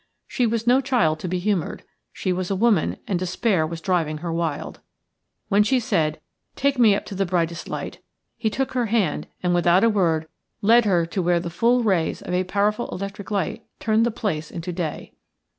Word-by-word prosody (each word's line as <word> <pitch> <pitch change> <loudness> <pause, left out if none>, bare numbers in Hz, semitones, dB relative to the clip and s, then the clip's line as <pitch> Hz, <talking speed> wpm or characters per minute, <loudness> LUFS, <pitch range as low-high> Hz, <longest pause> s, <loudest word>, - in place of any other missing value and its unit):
She 245 - +1
was 230 0 -1
no 250 +3 +4
child 210 - +1
to - - -4
be 180 +1 -1
humoured; 185 -2 -1 0.3
she 185 - -2
was 180 0 -3
a 195 - 0
woman 210 -4 +2
and 185 -3 0
despair 185 -1 +1
was 165 0 -6
driving 165 -4 0
her 165 +1 -4
wild. 165 -3 -3 0.7
When 205 0 +4
she 250 +5 +3
said, 160 -9 0 0.4
"Take 280 -1 +1
me 220 -4 +6
up - - -4
to - - -7
the 195 +1 0
brightest 170 -2 -1
light," - - -5 0.4
he 220 - -1
took 265 +4 -2
her 245 -2 0
hand 205 -8 0 0.2
without 175 +1 +3
a 230 - +5
word 170 -6 +2
and 160 - -25 0.4
led 235 0 +6
her 175 -5 +3
to 175 +3 -2
where 175 0 +2
the 170 0 -5
full 235 +7 +2
rays 185 -7 0
of - - -5
a 180 +1 +2
powerful 205 +4 0
electric 200 +2 -6
light 210 +2 -2 0.2
turned 220 0 +2
the 235 - +2
place 195 -9 -3
into 175 +1 -5
day. 165 -3 -4
185 Hz, 200 wpm, -23 LUFS, 170-220 Hz, 0.7 s, me